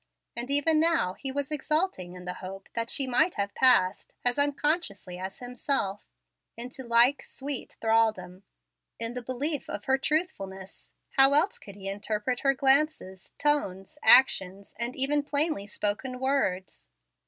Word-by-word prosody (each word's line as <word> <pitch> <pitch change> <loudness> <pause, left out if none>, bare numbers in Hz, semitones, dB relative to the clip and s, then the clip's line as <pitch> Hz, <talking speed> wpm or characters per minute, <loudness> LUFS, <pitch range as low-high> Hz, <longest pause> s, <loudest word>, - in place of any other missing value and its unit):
And 240 +2 -4
even 290 +3 +3
now 325 - +2
he 270 +6 -5
was 285 +1 -3
exulting 300 - -2
in 180 0 -10
the 180 - -3
hope 195 +1 -9
that 230 0 -3
she 275 - +2
might 310 +8 +1
have 200 -1 -2
passed, 205 -8 +3
as 245 +3 +2
unconsciously 285 - -1
as 190 +1 -6
himself, 245 -4 -3 0.5
into 250 +3 -7
like 235 +3 +3
sweet 275 0 -5
thraldom. 220 -5 +1 0.6
In 230 +1 -1
the 250 - -5
belief 270 +5 -3
of - - -6
her 265 0 +2
truthfulness, 195 - -4 0.3
how 270 +1 +7
else 325 +8 +2
could 200 - -12
he 195 -1 -8
interpret 210 +5 -2
her 275 0 +2
glances, 270 - 0
tones, 295 -4 -1
actions, 195 -6 +4
and 235 +2 -1
even 285 +2 +2
plainly 285 -7 0
spoken 215 +5 -3
words? 220 - -1
250 Hz, 145 wpm, -27 LUFS, 200-285 Hz, 0.6 s, how